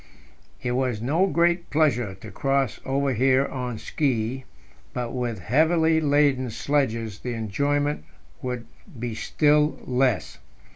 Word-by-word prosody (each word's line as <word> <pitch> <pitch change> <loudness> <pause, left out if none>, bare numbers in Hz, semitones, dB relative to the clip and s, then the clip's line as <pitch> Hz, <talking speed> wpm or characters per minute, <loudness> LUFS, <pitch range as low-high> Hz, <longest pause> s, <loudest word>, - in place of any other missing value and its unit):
It 125 - -1
was 125 -3 0
no 155 - +2
great 170 -1 +1
pleasure 125 -10 +1
to 110 - -9
cross 135 -3 0
over 135 0 +1
here 130 +3 +3
on 125 -4 -4
ski, 130 -1 -1 0.5
but 120 -2 -3
with 120 -3 -2
heavily 160 - +3
laden 145 -3 +3
sledges 115 -4 -1
the 125 - -4
enjoyment 140 - 0 0.4
would 125 -2 -4 0.3
be 120 -1 -3
still 150 +5 +2
less. 125 -1 0
130 Hz, 125 wpm, -25 LUFS, 120-145 Hz, 0.5 s, here